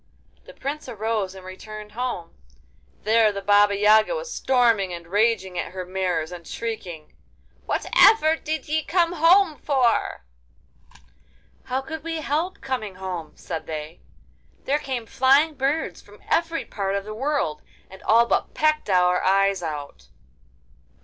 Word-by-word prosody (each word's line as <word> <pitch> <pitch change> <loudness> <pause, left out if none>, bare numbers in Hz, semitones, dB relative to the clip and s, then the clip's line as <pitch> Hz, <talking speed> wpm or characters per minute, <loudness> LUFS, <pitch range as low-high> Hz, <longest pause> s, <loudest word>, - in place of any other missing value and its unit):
The - - -14
Prince 290 +3 -5
arose 215 -3 -2
and 190 -1 -11
returned 210 +3 -9
home. 235 -8 -4 0.7
There 220 0 +4
the 200 -1 -6
Baba 205 0 +4
Yaga 215 - +4
was - - -5
storming 230 -7 +2
and 170 -1 -7
raging 195 -1 +1
at 170 - -5
her 185 -1 -5
mares, 180 -3 -2
and 175 -2 -9
shrieking: 180 -9 -6 0.5
'Whatever 320 -8 +4
did 315 0 -4
ye 310 +1 0
come 340 +1 +1
home 340 0 +4
for?' 255 - +1 1.4
'How 260 +1 -1
could 320 +3 -7
we 330 0 -3
help 330 +7 -2
coming 230 -8 -4
home?' 185 -4 -6
said 160 - -6
they. 155 0 -6 0.6
'There 290 +2 +1
came 260 -5 -4
flying 270 +6 +3
birds 280 +3 -2
from - - -18
every 330 0 +1
part 195 -1 -3
of 200 - -2
the 215 - -6
world, 265 - -1 0.3
and 190 0 -14
all 230 +2 +4
but - - -1
pecked 305 -5 +1
our 180 -1 +3
eyes 195 0 +3
out. 145 - -6
220 Hz, 145 wpm, -24 LUFS, 185-290 Hz, 1.4 s, There